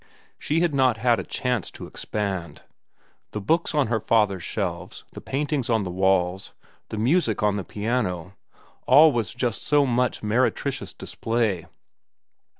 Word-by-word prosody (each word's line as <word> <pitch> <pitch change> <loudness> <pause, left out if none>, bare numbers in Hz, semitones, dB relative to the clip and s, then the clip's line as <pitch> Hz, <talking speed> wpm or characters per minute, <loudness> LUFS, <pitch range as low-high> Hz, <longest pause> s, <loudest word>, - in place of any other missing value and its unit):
She 160 +3 0
had 175 -3 +1
not 130 -4 +3
had 120 +1 +2
a - - -3
chance 125 -6 -2
to - - -9
expand. 95 -7 -4 0.7
The 105 - -2
books 165 +10 0
on 145 -2 +3
her 110 0 0
father's 105 -4 +2
shelves, - - -4
the - - -9
paintings 140 -2 -2
on 110 -3 +2
the 90 - -4
walls, 95 0 +1 0.4
the 110 - -5
music 115 - +1
on 105 -1 +2
the 100 - -3
piano—all 110 - +1
was 115 -8 -1
just 120 -3 -1
so 145 -1 +3
much 125 -2 0
meretricious 130 +5 0
display. 110 -7 -2
115 Hz, 145 wpm, -24 LUFS, 100-130 Hz, 0.7 s, not